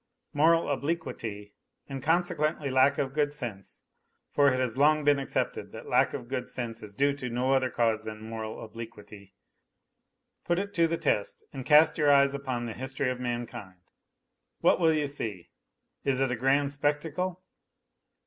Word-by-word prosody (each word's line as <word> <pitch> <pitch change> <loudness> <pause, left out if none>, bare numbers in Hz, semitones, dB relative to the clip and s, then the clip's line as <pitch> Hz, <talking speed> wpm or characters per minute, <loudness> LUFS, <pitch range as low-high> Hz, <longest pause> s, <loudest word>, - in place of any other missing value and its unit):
Moral 165 +3 +4
obliquity 130 -9 -3 0.3
and 135 -1 -6
consequently 155 -2 0
lack 130 +2 +4
of 135 -1 -1
good 145 -1 +1
sense; 115 -9 -7 0.5
for 140 -1 +4
it 130 - 0
has 125 -3 -1
long 150 +2 +4
been 145 -1 +4
accepted 135 - -2
that - - -8
lack - - +2
of - - -7
good 130 0 -4
sense 115 -2 -5
is 105 - -8
due 140 +7 +2
to 135 -3 -5
no 125 +3 0
other 130 -1 +3
cause 115 -3 +1
than 110 -1 -7
moral 110 -1 -6
obliquity. 105 -3 -11 1.1
Put 175 - 0
it 200 +1 -3
to 170 -1 +3
the 165 +1 -1
test 105 -9 -1
and 130 -2 -6
cast 155 +1 +6
your 150 -1 +4
eyes 140 -1 +5
upon 130 -4 -3
the 115 - -4
history 130 +1 -2
of 125 - -5
mankind. 120 -6 -5 0.8
What - - +4
will 165 -2 +4
you 155 -2 +1
see? 110 -10 -4 0.5
Is 135 -2 +1
it 135 -2 +1
a - - 0
grand 135 +3 +2
spectacle 155 +5 -2
135 Hz, 165 wpm, -28 LUFS, 120-150 Hz, 1.1 s, cast